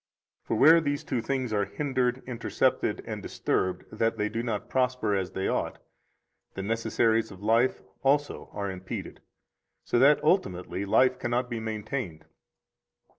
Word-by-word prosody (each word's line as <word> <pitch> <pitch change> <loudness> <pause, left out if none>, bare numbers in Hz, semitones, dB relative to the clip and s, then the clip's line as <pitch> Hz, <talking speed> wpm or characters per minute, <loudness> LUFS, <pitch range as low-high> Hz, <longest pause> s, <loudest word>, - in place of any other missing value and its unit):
For - - -2
where 160 +8 +7
these 145 -2 -1
two 125 -3 -1
things 130 -1 -2
are 100 -1 +2
hindered 130 +2 -1
[intercepted 125 -3 0
and - - -5
disturbed] 90 -1 -1
that 115 +1 0
they 105 0 0
do 115 +2 -2
not 115 -4 -3
prosper 125 -5 +1
as 95 -2 -1
they 95 - -1
ought, - - -1 0.8
the 95 - -4
necessaries 115 +1 +1
of 95 0 -12
life 115 +4 +2 0.2
also 145 +2 +1
are 100 -1 -3
impeded, 95 0 -7 0.6
so 120 - +1
that 145 +3 +5
ultimately 95 - 0
life 130 +5 +3
cannot 120 +1 -1
be 115 - -2
maintained. 110 - -4
115 Hz, 145 wpm, -28 LUFS, 100-130 Hz, 0.8 s, where